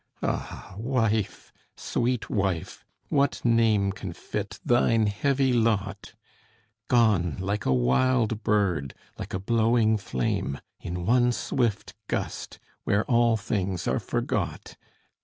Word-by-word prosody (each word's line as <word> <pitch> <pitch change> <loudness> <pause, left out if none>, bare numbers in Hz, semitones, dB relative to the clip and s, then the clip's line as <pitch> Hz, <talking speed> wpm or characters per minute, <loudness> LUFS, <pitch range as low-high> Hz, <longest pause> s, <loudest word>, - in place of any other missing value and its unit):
Ah - - -4
wife, 115 -4 -1 0.2
sweet 120 -1 -1
wife, 95 -5 -2 0.3
what 140 -1 +2
name 110 -4 +3
Can 95 -3 -6
fit 105 +3 -5
thine 115 -2 +3
heavy 135 +5 +1
lot? 105 -3 0 0.7
Gone 105 -9 +3
like 100 +3 -2
a - - +3
wild 110 - +2
bird, 90 -11 0 0.2
like - - -5
a - - -2
blowing 110 +1 +2
flame, 70 -5 -2 0.2
In 90 0 -5
one 125 +3 +4
swift 120 -2 -1
gust, - - -4 0.3
where 100 +2 +1
all 120 -3 +3
things 95 -3 -2
are - - +1
forgot! - - -3
110 Hz, 115 wpm, -26 LUFS, 95-120 Hz, 0.7 s, one